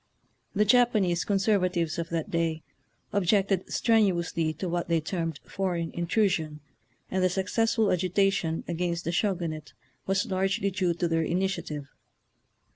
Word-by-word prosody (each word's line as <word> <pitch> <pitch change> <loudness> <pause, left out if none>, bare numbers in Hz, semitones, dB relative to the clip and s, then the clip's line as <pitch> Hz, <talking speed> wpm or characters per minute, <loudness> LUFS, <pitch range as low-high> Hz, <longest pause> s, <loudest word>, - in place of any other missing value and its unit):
The 210 +1 +3
Japanese 210 -7 +3
conserva 195 -2 +2
tives 170 -2 -1
of 165 0 -3
that 170 +4 -3
day 165 -2 -1 0.5
objected 195 -1 +1
strenuously 175 -7 +2
to 170 +5 -5
what 175 0 -2
they 170 -1 +2
termed 165 -2 -3
foreign 175 -4 -2
intrusion, 170 -4 0 0.5
and 185 0 +1
the 185 - +4
successful 220 +3 +1
agitation 185 -2 +1
against 170 0 -2
the 170 - -2
Sho 195 +2 +1
gunate 155 -3 -5 0.3
was 195 +1 +1
largely 195 +1 0
due 180 -3 0
to 175 0 0
their 165 0 +1
initiative. 170 -4 -2
180 Hz, 135 wpm, -27 LUFS, 165-195 Hz, 0.5 s, the